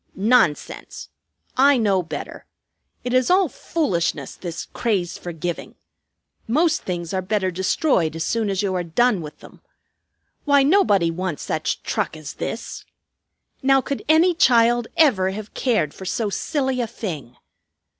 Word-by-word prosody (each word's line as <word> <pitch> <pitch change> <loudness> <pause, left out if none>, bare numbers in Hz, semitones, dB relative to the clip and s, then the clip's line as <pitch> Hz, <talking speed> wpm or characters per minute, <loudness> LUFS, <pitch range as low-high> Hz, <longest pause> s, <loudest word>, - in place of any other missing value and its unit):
Nonsense! 195 -7 0 0.5
I 275 +1 +6
know 200 -5 +2
better. 155 -4 -7 0.6
It 250 - -3
is 255 -1 +3
all 370 0 +4
foolishness, 170 - -2
this 170 -2 -6
craze 195 -7 -1
for 175 - -7
giving. 170 +1 -5 0.7
Most 310 +7 +2
things 175 -2 -4
are 190 - 0
better 190 0 -1
destroyed 185 - +1
as 165 - -2
soon 225 0 0
as 195 0 -1
you 195 -2 0
are 180 -1 -1
done 205 +4 +2
with 150 -1 -10
them. - - -15 0.8
Why, 285 -2 +4
nobody 270 - +3
wants 180 -2 -4
such 155 0 -2
truck - - -2
as 155 -1 -8
this. 230 - -5 0.8
Now, 270 0 +4
could 275 +1 -4
any 330 +3 +5
child 240 -6 +4
ever 215 - +4
have 210 +2 -7
cared 215 - 0
for 190 - -10
so 215 +1 -1
silly 265 0 -1
a 235 - -2
thing?" 160 - -6
205 Hz, 145 wpm, -22 LUFS, 175-260 Hz, 0.8 s, I